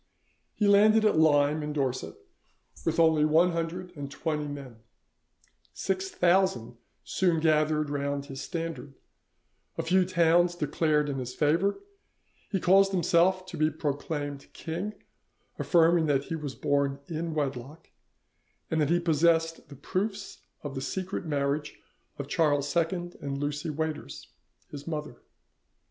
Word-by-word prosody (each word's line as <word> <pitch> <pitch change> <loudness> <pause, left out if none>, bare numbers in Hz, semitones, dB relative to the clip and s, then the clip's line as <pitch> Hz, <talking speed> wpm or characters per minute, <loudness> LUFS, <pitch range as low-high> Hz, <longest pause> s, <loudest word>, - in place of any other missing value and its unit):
He 210 - +1
landed 215 +2 +5
at 210 -7 +3
Lyme, 150 -1 +4
in 150 0 -4
Dorset, 135 - -2 0.7
with 165 0 0
only 160 -2 +4
one 160 +4 +4
hundred 170 +2 -4
and 140 -2 -6
twenty 150 0 -3
men; 140 -5 -8 1.0
six 190 0 -2
thousand 175 -12 +1 0.3
soon 170 - +1
gathered 155 -1 +2
round 140 0 -2
his 135 -1 -7
standard; 165 -5 -5 0.8
a - - -1
few 185 +2 +3
towns 175 -1 +3
declared 150 -1 +1
in 135 -2 -3
his 125 0 -6
favour; 165 +7 +2 0.7
he 195 - 0
caused 195 +2 +4
himself 185 +1 +2
to - - -8
be 155 0 +3
proclaimed 145 -1 -4
king, 180 +6 -5 0.6
affirming 165 -1 +4
that 140 -2 +2
he 165 - -4
was 145 -4 -5
born 140 -1 0
in 165 0 -4
wedlock, 140 0 -4 0.8
and 160 -1 +1
that 150 - +1
he 175 +1 +3
possessed 165 -1 +1
the 140 - -10
proofs 195 +7 -4 0.2
of 145 -2 -5
the 135 - -4
secret 185 +3 -4
marriage 145 0 -2 0.4
of 140 - -5
Charles 145 -2 +1
II 175 +1 0
and 140 -1 -3
Lucy 145 +3 -3
Waiters, 155 - -4 0.4
his 145 +1 -9
mother. 150 -6 -5
155 Hz, 135 wpm, -28 LUFS, 145-175 Hz, 1.0 s, landed